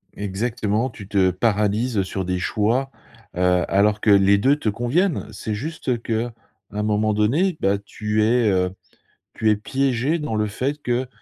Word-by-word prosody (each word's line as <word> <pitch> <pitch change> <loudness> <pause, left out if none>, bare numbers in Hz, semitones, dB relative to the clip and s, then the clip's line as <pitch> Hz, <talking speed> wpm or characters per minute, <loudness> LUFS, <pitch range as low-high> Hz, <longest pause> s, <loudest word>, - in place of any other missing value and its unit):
Exactement, 110 +3 -1
tu 100 -4 -11
te 95 -2 +3
paralyses, 105 +3 0
heu, 100 - +3
sur 95 0 -4
des 90 0 -1
choix, 115 +8 0 0.5
heu, 90 0 +2
alors 105 +2 +2
que - - +1
les 100 0 +6
2 135 +8 +3
te 145 -7 -2
conviennent. 135 - 0
C'est 110 +1 -5
juste 130 0 -3
qu'un 115 +1 -2 0.4
moment 105 +1 0
donné, 150 - +1
bah, 100 +1 +2
tu 105 +1 -2
es, 115 0 +3
heu, 90 -1 +1 0.6
tu 110 - +1
es 105 - +4
piégé 135 +7 0
dans 150 -8 -3
le 105 0 +1
fait 135 +8 -3
que, 125 0 -1
110 Hz, 165 wpm, -22 LUFS, 100-125 Hz, 0.6 s, les